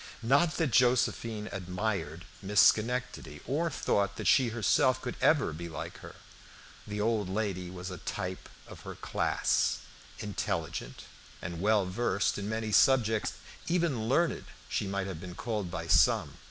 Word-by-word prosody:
Not 140 Hz, +7 st, +3 dB
that 160 Hz, -6 st, +1 dB
Josephine 115 Hz, -3 st, +2 dB
admired 90 Hz, -3 st, -3 dB, 0.2 s
Miss 100 Hz, +1 st, +1 dB
Schenectady, 125 Hz, +3 st, +2 dB
or 160 Hz, +5 st, 0 dB
thought 100 Hz, -9 st, 0 dB
that -, -, -6 dB
she 130 Hz, -, +5 dB
herself 120 Hz, +3 st, +2 dB
could 125 Hz, -1 st, -5 dB
ever 140 Hz, -, +3 dB
be 85 Hz, +2 st, -6 dB
like 80 Hz, -, -7 dB
her. -, -, -11 dB, 0.7 s
The 105 Hz, 0 st, -4 dB
old 105 Hz, -2 st, 0 dB
lady 95 Hz, -3 st, -2 dB
was 90 Hz, 0 st, -7 dB
a 90 Hz, -, -7 dB
type 90 Hz, 0 st, -5 dB, 0.2 s
of -, -, -12 dB
her -, -, -8 dB
class; -, -, 0 dB, 0.4 s
intelligent 105 Hz, -2 st, -4 dB, 0.4 s
and 85 Hz, 0 st, -6 dB
well 105 Hz, -1 st, +3 dB
versed 100 Hz, +1 st, 0 dB
in 100 Hz, +1 st, -4 dB
many 110 Hz, 0 st, -2 dB
subjects 115 Hz, -2 st, +3 dB, 0.3 s
even 160 Hz, -11 st, 0 dB
learned 170 Hz, +6 st, +1 dB, 0.2 s
she 100 Hz, -, -2 dB
might 100 Hz, 0 st, -2 dB
have 90 Hz, -5 st, -6 dB
been 90 Hz, -1 st, -8 dB
called 105 Hz, -4 st, -3 dB
by 85 Hz, -1 st, -5 dB
some. 85 Hz, -, +3 dB
105 Hz, 150 wpm, -30 LUFS, 95-125 Hz, 0.7 s, she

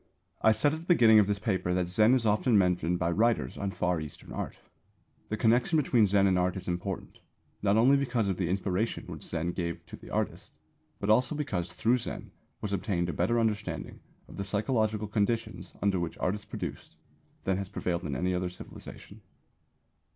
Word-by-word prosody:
I 110 Hz, -, +6 dB
said 110 Hz, +7 st, +2 dB
at 160 Hz, -, -3 dB
the 165 Hz, -, -12 dB
beginning 115 Hz, -11 st, +7 dB
of 100 Hz, -, +4 dB
this 105 Hz, -1 st, 0 dB
paper 95 Hz, -3 st, -1 dB
that 90 Hz, -1 st, 0 dB
Zen 105 Hz, +7 st, +4 dB
is 125 Hz, -3 st, 0 dB
often 105 Hz, +2 st, +3 dB
mentioned 90 Hz, -2 st, +2 dB
by 85 Hz, -1 st, 0 dB
writers 115 Hz, +6 st, +1 dB
on 100 Hz, -, -2 dB
Far 90 Hz, -3 st, -1 dB
Eastern 75 Hz, -2 st, -9 dB
Art. -, -, -5 dB, 0.7 s
The 105 Hz, -, -2 dB
connection 120 Hz, +8 st, +3 dB
between 125 Hz, -7 st, +3 dB
Zen 100 Hz, 0 st, +3 dB
and 95 Hz, -2 st, +3 dB
art 90 Hz, +1 st, 0 dB
is 95 Hz, -, -8 dB
important, 90 Hz, +2 st, -4 dB, 0.4 s
not 100 Hz, +1 st, +3 dB
only 130 Hz, +5 st, +6 dB
because 125 Hz, -6 st, 0 dB
of 95 Hz, -2 st, -1 dB
the 90 Hz, -3 st, -1 dB
inspiration 95 Hz, +3 st, -1 dB
which -, -, -8 dB
Zen 85 Hz, +2 st, -2 dB
gave 85 Hz, -2 st, -4 dB
to -, -, -9 dB
the -, -, -13 dB
artist, -, -, -3 dB, 0.5 s
but 100 Hz, -, +1 dB
also 125 Hz, +6 st, +3 dB
because 95 Hz, -, -2 dB
through 120 Hz, +7 st, +2 dB
Zen 120 Hz, -, -6 dB, 0.3 s
was 100 Hz, -1 st, -3 dB
obtained 90 Hz, -3 st, -1 dB
a -, -, -2 dB
better 120 Hz, 0 st, +1 dB
understanding 110 Hz, -2 st, -2 dB, 0.3 s
of -, -, -12 dB
the 100 Hz, -, -2 dB
psychological 110 Hz, +1 st, 0 dB
conditions 110 Hz, +2 st, -2 dB
under 100 Hz, -2 st, +2 dB
which 85 Hz, -1 st, -4 dB
art 90 Hz, -, 0 dB
is 105 Hz, 0 st, -7 dB
produced -, -, -6 dB, 0.5 s
than 95 Hz, -1 st, +1 dB
has 100 Hz, -1 st, -4 dB
prevailed 90 Hz, -3 st, -2 dB
in 75 Hz, -5 st, -3 dB
any 90 Hz, +8 st, 0 dB
other 90 Hz, 0 st, -1 dB
civilisation. 90 Hz, -, -11 dB
100 Hz, 195 wpm, -29 LUFS, 90-115 Hz, 0.7 s, beginning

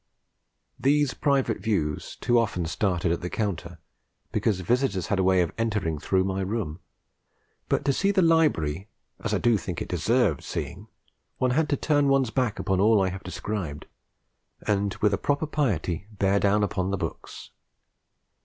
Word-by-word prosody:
These 145 Hz, 0 st, +2 dB
private 135 Hz, -7 st, +1 dB
views 95 Hz, -8 st, -2 dB
too 120 Hz, -1 st, +2 dB
often 105 Hz, -7 st, -1 dB
started 90 Hz, 0 st, 0 dB
at 85 Hz, -, -1 dB
the 90 Hz, -, -4 dB
counter, 90 Hz, -6 st, -3 dB, 0.5 s
because 100 Hz, -4 st, 0 dB
visitors 100 Hz, -2 st, 0 dB
had 100 Hz, -, +1 dB
a -, -, +3 dB
way 95 Hz, 0 st, +4 dB
of 85 Hz, -, -4 dB
entering 105 Hz, -9 st, -1 dB
through 95 Hz, +4 st, +1 dB
my 95 Hz, 0 st, -2 dB
room; 95 Hz, -5 st, -3 dB, 0.9 s
but -, -, 0 dB
to 140 Hz, -, +3 dB
see 195 Hz, +8 st, +1 dB
the 195 Hz, -2 st, +3 dB
library 100 Hz, -, +2 dB, 0.4 s
as -, -, -1 dB
I -, -, +2 dB
do 120 Hz, -2 st, +3 dB
think 85 Hz, -2 st, -5 dB
it -, -, -4 dB
deserved 95 Hz, -, +1 dB
seeing, 95 Hz, +5 st, -5 dB, 0.5 s
one 130 Hz, -1 st, +1 dB
had 150 Hz, +4 st, +1 dB
to 145 Hz, -, +1 dB
turn 145 Hz, -1 st, +2 dB
one's 135 Hz, -4 st, +2 dB
back 125 Hz, -5 st, 0 dB
upon 95 Hz, -2 st, 0 dB
all 110 Hz, +2 st, +5 dB
I 95 Hz, -1 st, +2 dB
have 95 Hz, +1 st, -6 dB
described, 90 Hz, -11 st, -5 dB, 0.8 s
and 100 Hz, -2 st, 0 dB
with 105 Hz, -1 st, +4 dB
a 100 Hz, -, 0 dB
proper 145 Hz, +2 st, 0 dB
piety 100 Hz, -, -1 dB
bear 100 Hz, -1 st, +1 dB
down 105 Hz, +1 st, +3 dB
upon 95 Hz, -2 st, -1 dB
the 100 Hz, -, -1 dB
books. 80 Hz, -3 st, -7 dB
100 Hz, 170 wpm, -26 LUFS, 90-125 Hz, 0.9 s, all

